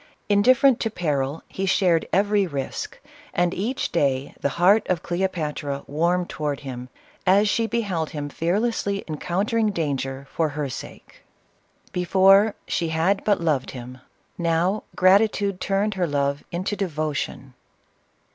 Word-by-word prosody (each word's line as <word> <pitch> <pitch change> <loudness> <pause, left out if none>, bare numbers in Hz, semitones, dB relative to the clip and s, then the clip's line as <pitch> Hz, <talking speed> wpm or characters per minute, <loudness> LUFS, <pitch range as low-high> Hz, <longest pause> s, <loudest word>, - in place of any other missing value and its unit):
Indifferent 255 +5 +5
to 225 - 0
peril, 150 -6 -2
he 195 0 -3
shared 180 -3 +2
every 200 0 +2
risk; 140 -4 -5 0.4
and 175 0 +2
each 230 +8 -2
day 140 -4 0
the - - +1
heart 200 +5 +5
of 180 -3 0
Cleopatra 155 -6 -2
warmed 175 +4 0
toward 145 -2 -3
him, 125 -2 -7 0.4
as 200 +3 +5
she 225 +2 +1
beheld 195 -10 -1
him 145 -1 -5
fear 165 +6 -1
lessly 210 -4 -1
encountering 200 +8 0
danger 140 -6 -3
for 160 -2 0
her 145 -1 -3
sake. - - -10 0.7
Before, 195 +3 +4
she 170 - -1
2 160 - -3
26 - - -2
CLEOPATRA. 160 +2 +1
had 195 0 +1
but 200 -5 +1
loved 145 -5 0
him, 125 +1 -9 0.2
— - - -41
now, 170 +4 +1
gratitude 200 0 +3
turned 200 +2 0
her 185 -3 0
love 140 -1 -1
into 185 +4 -2
devotion. 155 -7 -3
175 Hz, 145 wpm, -24 LUFS, 150-200 Hz, 0.7 s, Indifferent